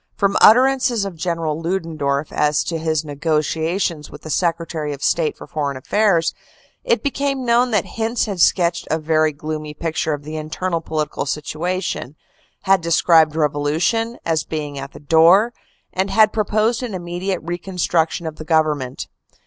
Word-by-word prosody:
From 200 -1 +1
utterances 250 -2 +5
of 195 -3 -6
General 165 -2 -2
Ludendorff 160 -5 -2
as 150 0 +2
to 165 -1 -3
his 160 -1 -1
negotiations 160 +2 -1
with 145 - -12
the 155 - -6
Secretary 165 -3 -1
of 140 - -8
State 160 -3 +1
for - - -10
Foreign 145 -3 -3
Affairs, 170 +2 +2 0.5
it - - +1
became 275 -2 -1
known 240 +1 +3
that 210 -6 +1
Hintze 230 +1 -1
had 195 -5 -3
sketched 170 -1 +2
a 160 - +1
very 155 0 +2
gloomy 155 0 -6
picture 160 -1 -2
of 145 - -12
the 155 +1 -6
internal 165 +3 -3
political 155 -3 -3
situa 165 +6 -2
tion, 135 +5 -4 0.5
had 195 -1 +3
described 165 -2 +4
revolution 160 +10 0
as 160 -3 +1
being 145 -3 -5
at 135 +1 -8
the - - -11
door, 170 +10 +5 0.4
and 190 +1 0
had 215 +2 +4
proposed 215 +2 +1
an 235 -6 -4
immediate 180 +2 -3
reconstruction 175 -1 -1
of 160 -1 -5
the - - -7
Government. 155 -5 0
165 Hz, 155 wpm, -20 LUFS, 155-195 Hz, 0.5 s, utterances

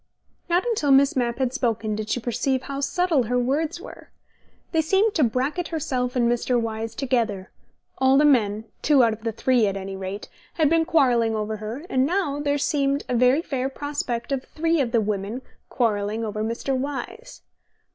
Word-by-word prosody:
Not 350 +4 +2
until 435 -12 0
Miss 275 +1 +5
Mapp 240 -2 0
had 260 -2 -1
spoken 225 -5 -1
did 215 0 -5
she 245 - 0
perceive 250 +3 -1
how 275 0 -5
subtle 325 -2 +1
her 245 +3 0
words 295 +7 0
were. - - -12 0.6
They 320 - +2
seemed 390 +7 +2
to 310 - +2
bracket 265 +9 0
herself 255 -6 -2
and 240 -2 +2
Mr. 240 +1 +1
Wyse 225 0 -4
together: 230 -7 -1 0.5
all 265 +1 +4
the 295 - +5
men 220 -6 +2 0.2
(two 285 -4 +4
out 230 -1 +3
of 220 - -10
the 230 - -1
three, 235 0 +2
at 195 0 -2
any 195 0 -6
rate) 190 +2 -6 0.3
had 310 -2 +2
been 330 -1 +3
quarrelling 245 -9 +3
over 215 0 -3
her, 220 +9 -6
and 260 -6 +1
now 335 -5 -1
there 290 0 0
seemed 280 -1 0
a - - -2
very 250 +6 +3
fair 265 -3 -2
prospect 275 -4 -4
of 270 -1 -1
three 330 0 0
of 240 -3 -1
the 230 -2 +3
women 210 +4 -3 0.3
quarrelling 215 -1 0
over 215 0 -3
Mr. 235 +4 -2
Wyse. 290 - -5
255 Hz, 185 wpm, -24 LUFS, 225-290 Hz, 0.6 s, Miss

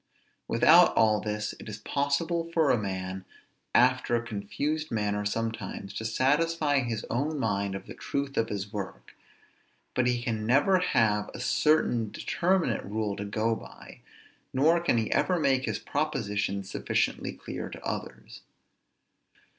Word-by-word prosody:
Without - - +6
all 110 -1 +4
this 105 0 -3
it - - -9
is 105 - -6
possible 155 +8 -1
for 160 -4 +4
a - - +3
man, 95 -1 -4 0.5
after 125 -1 +4
a 120 0 -1
confused 145 +10 -3
manner 105 -2 -1
sometimes 105 -2 -3
to 110 - -5
satisfy 145 +5 +2
his 115 -4 -3
own 145 +6 -1
mind 100 -6 -1
of 95 - -7
the - - -9
truth 140 0 -3
of 115 0 +1
his 100 +1 -4
work; 95 - -7 0.8
but 125 -1 +2
he 125 -1 +1
can 110 -3 -2
never 145 - +4
have 105 -11 +2
a - - -7
certain 125 -4 +2
determinate 170 - 0
rule 105 0 -2
to 100 - -5
go 110 +3 0
by, - - -12 0.5
nor 160 +6 +4
can 170 -8 +1
he 110 -2 -1
ever 185 - +2
make 135 -3 +2
his - - -1
propositions 105 -9 -2
sufficiently - - -1
clear - - -6
to - - -9
others. - - -6
115 Hz, 145 wpm, -28 LUFS, 105-145 Hz, 0.8 s, Without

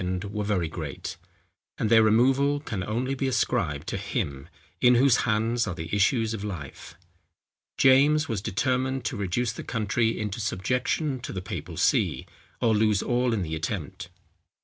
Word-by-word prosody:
were 105 0 -2
very 100 -5 0
great; 80 -3 -6 0.6
and 110 - -1
their 110 -1 +7
removal 135 +6 +3
can 105 -10 -4
only 120 +6 -2
be 135 0 -1
ascribed 80 - 0
to - - -3
Him, 70 -1 -4 0.3
in 125 0 +6
whose 130 0 +5
hands 115 +2 +1
are 90 - -3
the 80 +4 -4
issues 110 +2 +2
of 105 -2 -5
life. 85 -10 -7 0.8
James 145 +4 +5
was 110 -5 -2
determined 130 +6 -1
to - - -2
reduce 100 +4 -1
the 115 - -8
country 115 0 0
into 105 -1 -3
subjection 125 - -1
to - - -7
the 95 - -4
papal 90 - -6
see, - - +1 0.3
or 115 -2 +2
lose 105 -2 +2
all 125 0 +1
in 110 -4 0
the 80 -2 -5
attempt. 85 +1 -4
110 Hz, 160 wpm, -26 LUFS, 95-125 Hz, 0.8 s, their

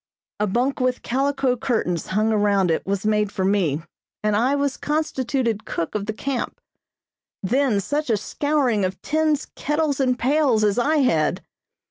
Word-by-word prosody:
A 210 - +1
bunk 250 +8 0
with 255 0 0
calico 270 0 +1
curtains 220 - -1
hung 215 +3 +1
around 200 -4 +2
it 160 - 0
was 195 +1 -1
made 210 -1 +1
for 195 -2 -1
me, 175 -7 +1 0.4
and 210 -1 +2
I 250 +6 +2
was 280 -1 0
constituted 260 -7 -1
cook 165 - -3
of 205 -1 -3
the - - 0
camp. 260 +3 -3 0.8
Then 245 +1 +2
such 290 +8 -2
a 220 - +3
scouring 260 -2 0
of 185 0 -2
tins, 310 -1 +1
kettles 300 -2 0
and 255 -2 +2
pails 260 -4 +2
as 210 +2 +2
I 305 +6 +2
had! 160 -11 +1
240 Hz, 160 wpm, -23 LUFS, 205-280 Hz, 0.8 s, a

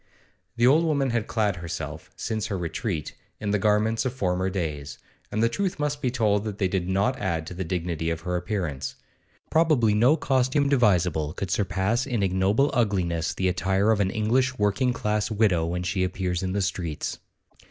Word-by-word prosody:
The 120 0 +3
old 150 +6 +5
woman 140 -5 +1
had 115 -2 -1
clad 105 -5 0
herself, 85 -1 -6
since 110 -1 -3
her 100 -2 -2
retreat, 85 - -3 0.3
in 100 - -2
the 105 - +2
garments 110 +2 +2
of 130 -2 -2
former 95 -5 0
days; 75 -7 -4 0.3
and 110 +2 0
the - - +5
truth 190 +10 -2
must 145 -1 -2
be 130 - +1
told 105 -4 +1
that 105 -2 -5
they 95 - +1
did 90 -1 -2
not 100 +7 +1
add 85 -3 -1
to 90 - -7
the 95 +2 -3
dignity 85 -2 -2
of 80 -1 -3
her 90 +1 -2
appearance. 90 -8 -3 0.6
Probably 155 -10 +3
no 120 +9 +4
costume 135 0 +1
devisable 90 - +2
could 95 -3 -4
surpass 105 +5 0
in 120 -6 0
ignoble 95 +9 +2
ugliness 90 -8 0
the 95 - 0
attire 95 +4 +2
of 110 - +2
an 95 -2 +2
English 125 +5 +1
working 105 +5 +2
class 105 -2 -1
widow 100 -7 +2
when 90 +1 -2
she 95 +1 0
appears 90 -1 -1
in 95 -1 -2
the 100 -1 0
streets. 85 -5 -3
100 Hz, 185 wpm, -25 LUFS, 90-115 Hz, 0.6 s, old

